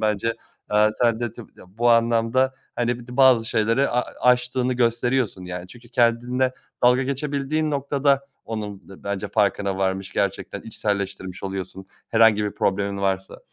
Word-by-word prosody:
Bence, 110 +1 0 0.3
aaa, 105 +1 +3
sen 115 0 +1
de 120 -3 -2
tabii, 115 -2 -12
ya, - - -14
bu 120 0 +4
anlamda, 115 +3 +3 0.2
hani, 120 0 0
bir 120 - -12
de 125 - -9
bazı 130 -4 +6
şeyleri 115 +4 +1
a 125 +1 +1 0.2
aştığını 125 0 +2
gösteriyorsun, 120 -3 0
yani. 90 0 -6
Çünkü 120 +2 -15
kendinle 125 +2 +2 0.3
dalga 125 +1 +5
geçebildiğin 140 +3 -1
noktada 140 -1 +1 0.2
onun 105 -3 -6
d 95 - -14
bence 100 -1 -3
farkına 100 -2 +1
varmış, 95 0 -1
gerçekten 100 0 -2
içselleştirmiş 100 -4 -4
oluyorsun 95 0 -5 0.2
herhangi 110 -2 +4
bir 105 - -1
problemin 100 0 -1
varsa. 95 -1 -1
115 Hz, 150 wpm, -23 LUFS, 100-125 Hz, 0.3 s, bazı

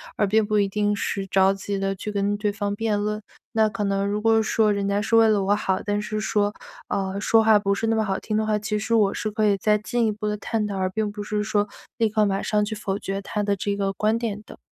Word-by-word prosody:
而 205 - +1
并 215 +2 +3
不 210 0 +1
一 200 - +2
定 205 +1 0
是 195 -1 -2
着 190 0 +3
急 195 0 -4
地 195 0 -1
去 210 +3 -5
跟 205 0 0
对 210 -1 0
方 205 -1 -3
辩 215 -1 0
论。 210 +1 -2 0.3
那 220 -1 +4
可 210 0 -3
能 195 0 0
如 205 +1 -1
果 225 0 +4
说 215 -1 +2
人 200 -1 -1
家 200 +1 +1
是 220 +2 +1
为 225 0 +6
了 210 -3 +2
我 205 +2 +2
好， 190 -1 -1
但 205 0 -1
是 215 0 -3
说， 205 0 0 0.3
呃， 195 0 -2
说 225 +2 +4
话 220 -1 +6
不 200 -1 +1
是 225 +3 -1
那 225 - +2
么 220 -1 +1
好 190 -1 -1
听 215 -1 -2
的 220 - +1
话， 215 -1 +1
其 210 0 -2
实 220 +2 -2
我 210 -3 +4
是 215 - -3
可 215 0 0
以 200 -1 +3
再 210 +2 +2
进 235 +2 0
一 215 - +2
步 210 0 -4
地 210 0 -1
探 210 +1 -2
讨 200 - -4
而 185 0 0
并 210 +1 -1
不 205 0 -6
是 210 0 -2
说 205 -1 0 0.3
立 230 -1 +3
刻 215 0 +2
马 195 -1 0
上 210 -1 +1
去 215 +1 -3
否 200 -2 -3
决 195 +1 -4
他 210 +2 -3
的 200 -1 +1
这 200 +1 -2
个 195 -1 -1
观 215 +3 +1
点 215 -3 -4
的。 - - -13
210 Hz, 300 characters per minute, -24 LUFS, 200-215 Hz, 0.3 s, 为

